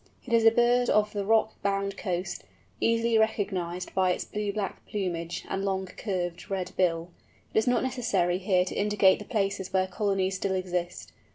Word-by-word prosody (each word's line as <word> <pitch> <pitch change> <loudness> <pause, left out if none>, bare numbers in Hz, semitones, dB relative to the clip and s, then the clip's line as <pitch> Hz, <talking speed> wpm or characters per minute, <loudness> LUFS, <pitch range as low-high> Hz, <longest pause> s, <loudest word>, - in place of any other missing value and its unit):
It 235 - -4
is 230 -1 +4
a - - +10
bird 240 +1 +3
of 210 0 +2
the 205 -1 -2
rock 220 +1 +2
bound 200 0 -1
coast, 180 -2 -3 0.4
easily 230 0 +2
recognized 185 -5 -1
by 190 -1 +2
its - - -4
blue 210 -1 -3
black 200 -1 -4
plumage 175 -4 -3
and 195 - -2
long, 190 -1 -1
curved, 180 -3 -4
red 190 -2 -2
bill. 170 -1 +1 0.4
It - - +4
is 220 - -1
not 245 - +3
necessary 195 -9 0
here 185 -1 +2
to - - -5
indicate 205 -2 +3
the 210 - -8
places 195 -4 -1
where 190 0 +2
colonies 190 -1 0
still 190 0 -1
exist. 180 -1 -3
195 Hz, 180 wpm, -28 LUFS, 185-215 Hz, 0.4 s, a